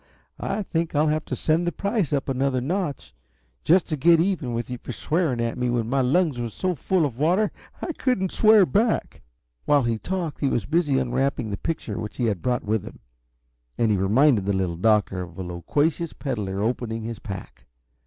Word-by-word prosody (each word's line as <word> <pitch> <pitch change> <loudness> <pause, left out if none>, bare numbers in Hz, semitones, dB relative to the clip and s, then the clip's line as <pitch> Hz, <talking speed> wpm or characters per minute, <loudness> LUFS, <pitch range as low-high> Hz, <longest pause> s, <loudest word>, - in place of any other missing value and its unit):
I 205 +2 -2
think 165 -4 -2
I'll 150 +1 +3
have 155 +1 -1
to - - -3
send 165 +2 +1
the - - +1
price 200 - -1
up 140 -2 0
another 135 -1 0
notch, 155 +2 -3 0.5
just 180 +3 +4
to 155 - 0
get 165 +4 +5
even 165 -9 0
with 120 - -3
you 125 -1 -6
for - - -7
swearing 155 -2 0
at 115 0 -2
me 125 0 0
when 120 -2 0
my 135 0 +2
lungs 145 +1 +2
were 120 -1 -2
so 185 - -2
full 175 +2 +1
of 125 -3 -5
water 180 +8 +2 0.3
I 335 - -2
couldn't 245 - 0
swear 215 -3 +6
back!" 215 +5 0 0.4
While 145 -2 +4
he 115 -2 0
talked 180 -3 -3
he 140 - +1
was 115 -6 -1
busy 150 - +1
unwrapping 130 -2 0
the 100 - -2
picture 155 -10 -4
which 105 - -6
he 125 - 0
had 100 -6 -1
brought 125 -1 0
with 110 -1 0
him, - - -10 0.8
and 115 -2 +2
he 105 - +2
reminded 105 +2 +3
the 100 - +2
Little 90 -3 -1
Doctor 105 -1 +2
of 85 -2 -9
a 95 - -4
loquacious 145 - -1
peddler 105 -8 -3
opening 115 -1 -2
his 115 0 -5
pack. 95 -5 -9
135 Hz, 205 wpm, -24 LUFS, 115-170 Hz, 0.8 s, swear